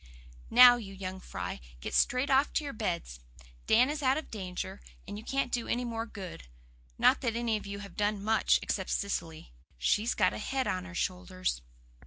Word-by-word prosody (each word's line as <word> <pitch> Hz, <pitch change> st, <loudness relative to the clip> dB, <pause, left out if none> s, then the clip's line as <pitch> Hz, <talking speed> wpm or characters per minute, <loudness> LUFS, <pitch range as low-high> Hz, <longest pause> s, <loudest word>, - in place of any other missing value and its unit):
Now, 245 Hz, +1 st, +9 dB
you 195 Hz, -4 st, -8 dB
young 190 Hz, 0 st, -5 dB
fry, 90 Hz, -, -5 dB, 0.2 s
get -, -, -6 dB
straight 255 Hz, +3 st, +2 dB
off 270 Hz, +2 st, +4 dB
to -, -, +1 dB
your 285 Hz, -, -5 dB
beds. 175 Hz, -, -3 dB, 0.5 s
Dan 245 Hz, +3 st, +5 dB
is 300 Hz, +1 st, -3 dB
out 265 Hz, 0 st, +3 dB
of 310 Hz, -, -6 dB
danger, 185 Hz, -, -5 dB, 0.3 s
and -, -, -6 dB
you 210 Hz, -, -7 dB
can't 270 Hz, 0 st, -1 dB
do 240 Hz, -2 st, -1 dB
any 245 Hz, +1 st, -1 dB
more 230 Hz, -1 st, -3 dB
good. 185 Hz, -, -9 dB, 0.5 s
Not -, -, +4 dB
that 235 Hz, -3 st, -1 dB
any 235 Hz, -1 st, 0 dB
of 210 Hz, -, -5 dB
you 200 Hz, 0 st, -5 dB
have 195 Hz, -, -13 dB
done 205 Hz, -1 st, 0 dB
much, 220 Hz, +1 st, +3 dB
except 190 Hz, -2 st, -2 dB
Cecily. 165 Hz, -, -3 dB, 0.2 s
She's 210 Hz, -, +1 dB
got 185 Hz, -3 st, +3 dB
a -, -, -5 dB
head 265 Hz, +4 st, -1 dB
of 185 Hz, 0 st, -2 dB
her 185 Hz, -1 st, -10 dB
shoulders." 185 Hz, -, -2 dB
210 Hz, 195 wpm, -30 LUFS, 185-245 Hz, 0.5 s, Now